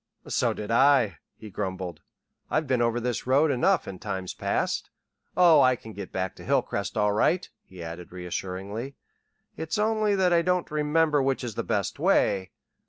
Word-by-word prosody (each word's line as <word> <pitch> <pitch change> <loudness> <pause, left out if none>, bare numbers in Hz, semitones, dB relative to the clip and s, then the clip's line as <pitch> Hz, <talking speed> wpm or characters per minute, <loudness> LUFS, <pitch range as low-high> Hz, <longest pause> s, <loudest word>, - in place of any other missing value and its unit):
"So - - +1
did 105 +1 -5
I," 120 - +4 0.2
he 110 - -11
grumbled. 95 -5 -4 0.5
"I've 155 - +1
been 130 -3 +1
over 120 0 +1
this 120 0 -3
road 140 +4 +4
enough 155 +8 +2
in 95 - -7
times 95 -3 -4
past. - - -1 0.5
Oh, 170 -5 +7
I 130 -1 +5
can 110 -2 -11
get 100 -2 -8
back 95 0 -3
to - - -11
Hilcrest 120 -7 -1
all 105 -1 +3
right," 175 - +2 0.2
he 90 -2 -10
added 85 +1 -8
reassuringly. 95 +7 -5 0.6
"It's 160 +5 -3
only 215 -1 +2
that 185 -2 +3
I 170 - +5
don't 180 -1 0
remember 150 0 +2
which 135 -1 0
is 120 -3 -4
the - - -2
best - - -2
way. 95 -1 +2
120 Hz, 170 wpm, -26 LUFS, 95-155 Hz, 0.6 s, Oh